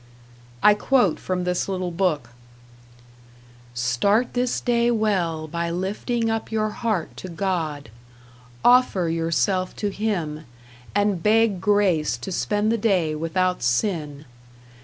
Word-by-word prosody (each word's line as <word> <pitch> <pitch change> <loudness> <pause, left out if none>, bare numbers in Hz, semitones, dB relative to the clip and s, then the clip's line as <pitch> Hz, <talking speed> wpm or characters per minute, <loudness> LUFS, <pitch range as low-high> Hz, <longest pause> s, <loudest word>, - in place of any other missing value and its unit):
I 210 - +8
quote 210 - +2
from 185 -1 -2
this 180 +2 -1
little 185 -2 -2
book: 165 -9 -1 1.4
Start 125 - +1
this 245 0 0
day 235 -1 +1
well 185 -9 0
by 170 +2 -3
lifting 205 +7 -2
up 225 0 -2
your 215 -1 0
heart 215 -6 -2
to 185 - -7
God. 165 - -3 0.7
Offer 245 -8 +4
yourself 165 +3 0
to 205 -1 -2
Him, 170 -8 -3 0.5
and 205 -3 +1
beg 215 -1 +3
grace 190 - +2
to 125 +10 -7
spend 210 +4 0
the 230 - 0
day 185 -8 +1
without 180 +4 -1
sin. 145 - -1
185 Hz, 120 wpm, -23 LUFS, 165-215 Hz, 1.4 s, I